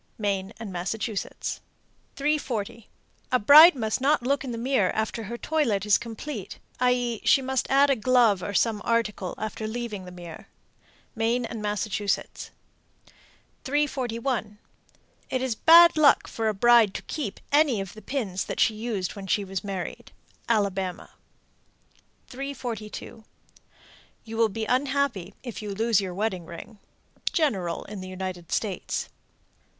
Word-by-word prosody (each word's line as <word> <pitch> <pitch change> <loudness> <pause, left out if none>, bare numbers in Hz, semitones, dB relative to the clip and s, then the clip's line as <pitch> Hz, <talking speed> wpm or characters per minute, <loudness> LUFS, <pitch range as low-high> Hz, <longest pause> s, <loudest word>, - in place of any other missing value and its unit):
Maine 200 -2 -2
and 215 -4 -7
Massachusetts. 200 +4 -4 0.5
340. 255 -7 -2 0.4
A 255 - +5
bride 300 +8 +9
must 220 -1 -2
not 280 -1 +2
look 275 +2 0
in 265 - -5
the 230 - -4
glass 235 -5 +1
after 220 +1 -2
her 235 +4 -5
toilet 235 -10 0
is 210 -1 +4
complete, 230 -2 -7 0.2
i.e., 245 -2 +1
she - - +5
must 265 -1 -2
add 275 +1 +5
a - - +3
glove 230 -4 +3
or 200 +2 -4
some 220 -1 +1
article 215 -5 -1
after 215 0 -4
leaving 220 -4 -5
the 180 - -10
mirror. 175 -2 -10 0.7
Maine 235 +1 0
and 230 -2 -6
Massachusetts. 205 -1 -2 1.1
341. 255 -6 -1 0.7
It 255 0 -1
is 260 -3 0
bad 335 +7 +7
luck 305 -2 +5
for 225 -1 -2
a 215 - +1
bride 235 -1 +5
to - - -5
keep 250 -11 -5
any 290 -6 +4
of 195 -2 -5
the 215 - -12
pins 200 -6 -3
that - - -5
she 225 0 +4
used 215 -4 -3
when 195 -1 -8
she 205 +2 +1
was 190 -1 -4
married. 195 -3 -6 0.4
Alabama. 195 -5 -1 1.1
342. 245 -5 -6 1.0
You 225 0 -8
will 225 -1 +3
be 220 +2 -4
unhappy 255 -7 0
if 240 -4 -6
you 210 - -6
lose 225 -1 +2
your 185 -2 -5
wedding 190 -4 -2
ring. 210 +6 -10 0.5
_General 195 - -1
in 205 -2 -7
the 185 - -7
United 185 -2 -6
States. 200 -5 -2
225 Hz, 145 wpm, -26 LUFS, 200-255 Hz, 1.1 s, bride